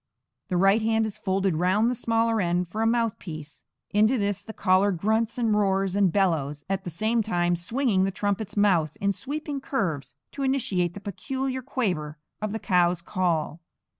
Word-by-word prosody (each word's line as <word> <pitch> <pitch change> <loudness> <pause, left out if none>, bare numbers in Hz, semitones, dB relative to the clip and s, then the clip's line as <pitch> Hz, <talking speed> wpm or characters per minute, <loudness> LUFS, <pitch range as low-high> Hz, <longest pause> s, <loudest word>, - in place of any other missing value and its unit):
The 180 - 0
right 195 +4 +4
hand 220 0 +2
is 215 - -6
folded 190 -3 0
round 185 +6 +2
the 245 - +1
smaller 230 -2 +1
end 175 0 0
for 215 +6 -4
a 225 - +3
mouthpiece; 195 -10 -3 0.3
into 215 +5 +3
this 200 -3 -1
the 220 - -9
caller 195 -1 +3
grunts 220 +6 0
and 230 -3 +1
roars 195 -2 +1
and 200 -3 +3
bellows, 150 -7 0
at 195 0 -2
the - - -3
same 220 +8 +1
time 175 -5 +1
swinging 200 +3 +1
the 195 - +1
trumpet's 205 +1 -2
mouth 175 -7 +2
in 200 0 +1
sweeping 285 - -4
curves 155 - -2 0.2
to 280 - -5
imitate 195 -10 0
the 200 - -7
peculiar 260 +6 -3
quaver 180 - -2 0.2
of 215 -1 -2
the 220 - -2
cow's 180 -4 +2
call. 170 -4 -1
200 Hz, 175 wpm, -26 LUFS, 175-225 Hz, 0.3 s, right